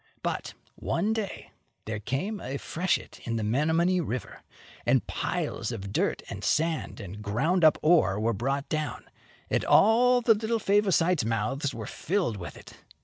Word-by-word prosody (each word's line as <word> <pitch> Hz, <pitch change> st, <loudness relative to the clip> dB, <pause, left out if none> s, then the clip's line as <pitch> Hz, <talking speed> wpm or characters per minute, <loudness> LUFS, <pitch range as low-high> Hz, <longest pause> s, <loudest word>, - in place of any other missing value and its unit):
But, -, -, -3 dB, 0.2 s
one 215 Hz, +2 st, -1 dB
day, 220 Hz, -3 st, -5 dB, 0.3 s
there 110 Hz, -1 st, -3 dB
came 140 Hz, -, -3 dB
a 135 Hz, +2 st, -4 dB
freshet 175 Hz, +6 st, -2 dB
in 115 Hz, -, -2 dB
the 110 Hz, -, -1 dB
Menomonee 160 Hz, -, +2 dB
River, 130 Hz, -5 st, -5 dB, 0.4 s
and -, -, +2 dB
piles -, -, -2 dB
of 100 Hz, -4 st, -6 dB
dirt -, -, 0 dB
and -, -, -7 dB
sand 160 Hz, 0 st, 0 dB
and 100 Hz, 0 st, -8 dB
ground 135 Hz, -, +1 dB
up 155 Hz, -1 st, +6 dB
iron 155 Hz, -, +4 dB
ore 105 Hz, -, +4 dB
were 115 Hz, +2 st, +1 dB
brought 135 Hz, +6 st, -2 dB
down, 155 Hz, -1 st, -3 dB, 0.4 s
and -, -, +1 dB
all 245 Hz, +4 st, +5 dB
the 230 Hz, -1 st, +5 dB
little 220 Hz, +2 st, -1 dB
Favosites' 190 Hz, -, +2 dB
mouths 115 Hz, +6 st, -1 dB
were 110 Hz, -2 st, -5 dB
filled 170 Hz, -, -1 dB
with 90 Hz, -, -8 dB
it. -, -, -14 dB
155 Hz, 160 wpm, -28 LUFS, 115-190 Hz, 0.4 s, up